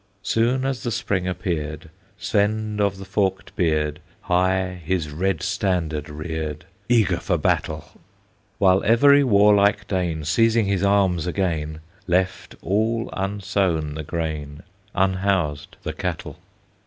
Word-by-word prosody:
Soon 120 +5 +1
as 135 -2 -2
the 120 - -2
Spring 100 -5 -1
appeared, 80 -4 -3 0.3
Svend 105 +1 0
of 100 -1 +1
the 95 - -9
Forked 95 0 -1
Beard 75 -3 0 0.2
High 90 0 0
his 80 -2 -1
red 90 +3 -1
standard 85 -6 -1
reared, 75 0 -5 0.2
Eager 115 -7 +3
for - - 0
battle; - - 0 0.7
While 95 -1 +4
every 140 +6 +6
warlike 105 -3 +4
Dane, 85 -5 -2
Seizing 115 +6 +3
his 100 -2 0
arms 95 -4 +2
again, 80 -4 -2 0.3
Left 90 +1 0
all 110 +5 0
unsown 95 -5 -1
the 80 - -5
grain, 75 -1 -4 0.3
Unhoused 95 -6 0
the - - -3
cattle. - - -5
95 Hz, 120 wpm, -23 LUFS, 80-100 Hz, 0.7 s, every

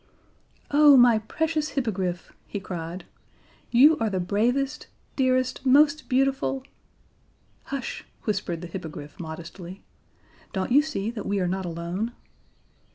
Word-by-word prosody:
"Oh, 290 -1 +7
my 240 -3 +6
precious 310 +7 -2
Hippogriff," 190 -8 -2
he 205 - -4
cried. 175 -1 -6 0.6
"You 295 +6 +6
are 225 - +1
the 190 -2 -1
bravest, 240 +9 0 0.3
dearest, 255 -1 +1
most 285 +3 +4
beautiful 270 0 +1 0.5
" - - -38
"Hush," 275 -3 -5 0.2
whispered 185 -5 -2
the 175 - -6
Hippogriff 150 -3 -8
modestly. 170 +3 -8 0.7
"Don't 190 +4 -2
you 280 +4 +7
see 230 -9 -3
that 220 -4 -6
we 200 0 0
are 180 - 0
not 190 +1 -2
alone?" 175 +7 -3
220 Hz, 125 wpm, -25 LUFS, 180-270 Hz, 0.7 s, Oh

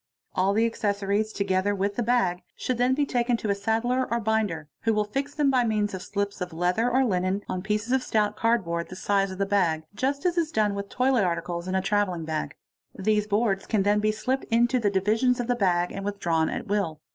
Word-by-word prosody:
All 190 +2 +2
the 225 +2 +3
accessories, 205 -1 -1
together 200 0 0
with 200 +1 -1
the 240 - -1
bag, 215 -7 +1
should 250 -2 -2
then 250 +1 +3
be 290 +1 +1
taken 245 -2 +1
to— 210 -3 0
saddler 225 +5 0
or 235 - +1
binder, 210 -8 -1
who 225 -1 +1
will 210 - +2
fix 275 +7 -4
them 290 -2 +3
by 255 -2 +3
means 210 -3 0
of 185 - -5
slips 200 +1 -3
of 180 0 -3
leather 180 +8 +1
or 260 +2 +3
line 185 -1 0
on 185 - -3
pieces 210 +3 -2
of 265 - +3
stout 210 -3 0
cardboard, 185 -8 0
the 185 - -8
size 195 +1 +1
of 185 - -7
the 195 - +1
bag, 180 -6 +1
just 275 - -2
as 350 -1 +2
is 320 -2 -1
done 210 -5 +1
wit 200 0 -5
toilet 255 -3 +2
articles 170 0 -2
in 185 - -1
a 190 - +1
travelling 195 -5 0
bag. 155 -1 -3 0.4
These 210 +1 +1
boards 205 -2 0
can 210 -4 +1
then 205 +1 +3
be 215 +1 +2
slipped 250 +5 -2
in' 230 +1 +3
the 240 -4 +1
divisions 220 +6 +2
of 245 - -1
the 245 - +1
bag 180 -5 +1
and 195 - -5
withdrawn 175 -6 0
at - - -4
will. 200 -7 -1
205 Hz, 225 wpm, -26 LUFS, 190-235 Hz, 0.4 s, the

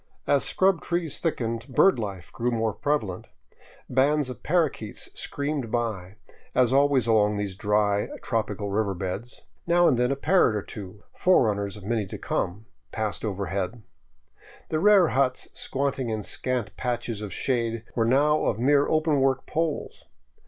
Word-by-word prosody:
As 140 - +3
scrub 190 -2 +2
trees 170 -4 -2
thickened, 115 -7 -2
bird 140 +4 +4
life 100 -5 -6
grew 120 +1 -1
more 115 -2 0
prevalent. 110 -12 -2 0.6
Bands 140 +1 +2
of 125 - -10
parrakeets 150 - -1
screamed 140 -4 -3
by, 105 -6 -2 0.4
as 125 0 +3
always 140 -3 +4
along 105 -2 +3
these 100 -2 -3
dry, 105 0 +1
tropical 110 -3 -2
river 100 -1 0
beds; 95 +6 -5 0.3
now 175 0 +5
and 125 -5 +3
then 125 +1 +2
a - - +1
parrot 160 - +3
or 105 - -2
two, 100 -1 -9
fore 185 -8 +4
runners 100 -2 -1
of 105 - -12
many 110 -1 -1
to - - -7
come, 105 +5 -3 0.3
passed 105 -5 -2
overhead. 100 +2 -3 0.9
The 155 - 0
rare 200 -2 +6
huts 130 -1 0
squatting 135 -2 -2
in 110 -1 -2
scant 125 -1 -2
patches 120 -3 -3
of 105 -2 -5
shade 115 0 -1
were 115 - +2
now 145 +6 +3
of - - +1
mere 140 +4 +3
open 155 -2 +2
work 135 -1 +1
poles. 160 -1 -3
120 Hz, 155 wpm, -26 LUFS, 105-140 Hz, 0.9 s, rare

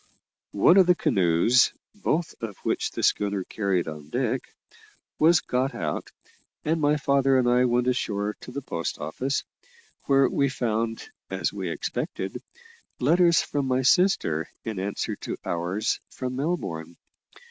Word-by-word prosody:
One 170 - +6
of 190 -2 +6
the 180 - +5
canoes 110 - +3 0.2
(both 175 -5 -1
of 110 -4 -5
which - - 0
the - - -5
schooner 100 -2 +1
carried 95 -3 -1
on 75 -2 -8
deck) 125 +4 0 0.8
was 160 +1 +5
got 130 +3 -1
out, 75 -3 -3 0.5
and 160 +1 +1
my 150 0 +3
father 135 -1 +3
and 125 -1 +2
I 125 +1 +4
went 125 0 +2
ashore 105 -5 -1
to - - -9
the 140 +2 -5
post 85 -9 -3
office, 130 - -2 0.6
where 135 -1 +4
we 140 +1 +1
found, 115 -2 -2 0.2
as - - -2
we - - -4
expected, - - -4 0.6
letters 170 +5 +4
from 140 -2 -2
my 130 0 +1
sister 125 - +2 0.2
in 110 -4 -3
answer 100 +2 -2
to - - -5
ours 90 +5 -1
from 130 -1 -5
Melbourne. 95 - -3
125 Hz, 145 wpm, -26 LUFS, 100-140 Hz, 0.8 s, One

